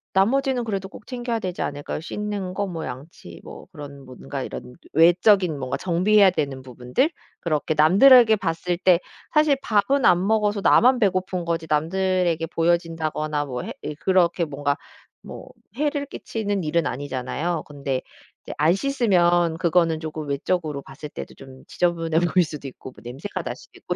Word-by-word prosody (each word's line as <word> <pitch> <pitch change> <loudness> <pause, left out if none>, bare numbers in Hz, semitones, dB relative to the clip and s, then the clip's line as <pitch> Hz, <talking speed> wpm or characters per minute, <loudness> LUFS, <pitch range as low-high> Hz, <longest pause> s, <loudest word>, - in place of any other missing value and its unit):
나머지는 255 +5 +2
그래도 195 -4 -4
꼭 205 - -14
챙겨야 240 -2 -3
되지 185 -4 -3
않을까요. 145 +1 -4
씻는 200 +1 -4
거 200 +1 -2
뭐 165 -3 -5
양치 130 +6 -10
뭐 - - -11
그런 140 -4 -10
뭔가 130 +2 -7
이런 125 - -8 0.2
외적인 175 +1 +4
뭔가 130 -1 -3
정비해야 190 +3 +4
되는 140 -6 -3
부분들. 125 - -1 0.3
그렇게 155 -1 -1
남들에게 220 - +7
봤을 175 -2 -2
때 180 -1 +4 0.3
사실 300 -2 +4
밥은 240 +6 +2
안 180 +1 +4
먹어서 210 -2 +1
나만 250 +4 +5
배고픈 185 -3 0
거지 165 -1 -2
남들에게 170 +1 +1
보여진다거나 165 -3 -1
뭐 125 -2 -5
해 - - -6
예 150 - -5
그렇게 175 0 +2
뭔가 145 -1 -2 0.5
뭐 - - -10 0.3
해를 290 0 -1
끼치는 205 -7 -4
일은 165 +1 0
아니잖아요. 145 +5 -3
근데 140 -3 -4 0.4
인제 - - -6
안 160 +3 +4
씻으면 175 -10 +2
그거는 170 -2 +2
쪼금 155 -1 -6
외적으로 150 0 -2
봤을 150 +2 -10
때도 - - -8
좀 135 -1 -14
지저분해 165 -2 0
보일 175 +1 +3
수도 150 -2 -8
있고 130 0 -10
뭐 - - -17
냄새가 135 +12 -6
날 - - -4
수도 - - -17
있고 - - -4
170 Hz, 355 characters per minute, -23 LUFS, 150-200 Hz, 0.5 s, 남들에게